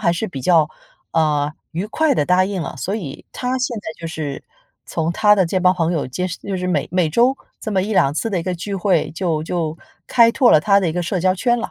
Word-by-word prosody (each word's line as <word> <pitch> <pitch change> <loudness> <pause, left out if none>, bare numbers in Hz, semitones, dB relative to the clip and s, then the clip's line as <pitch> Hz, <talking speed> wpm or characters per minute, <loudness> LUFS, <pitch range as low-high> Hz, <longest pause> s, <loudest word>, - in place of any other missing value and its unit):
还 - - +2
是 185 +6 -2
比 140 -9 -7
较， 160 +1 +4 0.4
呃， 150 -2 +1 0.2
愉 175 +5 -3
快 300 +6 +1
地 150 - +1
答 180 +2 +3
应 195 -2 -3
了。 - - -6
所 195 +9 -2
以 155 -9 -7
他 250 +1 -2
现 250 -1 -2
在 - - -10 0.2
就 165 - -5
是 150 -4 -5 0.4
从 165 +1 -1
他 210 +2 +5
的 190 - +4
这 185 +3 -1
帮 180 0 +5
朋 170 -1 0
友 160 -6 -1
结 180 +8 -2
识 180 - -6
就 195 -2 -4
是 180 - -3
每 165 -6 0
每 180 -2 +2
周 245 - +3 0.2
这 220 - -5
么 190 -3 +1
1-2 190 -9 +2
次 225 +8 -2
的 185 -4 0
一 - - -5
个 180 +1 -2
聚 195 +4 -5
会 185 -3 +1
就 165 -3 -1
就 165 -2 -2 0.3
开 230 -2 +5
拓 245 0 +4
了 - - +7
他 200 +4 +4
的 185 - 0
一 - - -2
个 175 +1 -1
社 180 +2 -2
交 185 +1 +2
圈 240 +5 +1
了。 230 - -4
180 Hz, 270 characters per minute, -20 LUFS, 160-205 Hz, 0.4 s, 了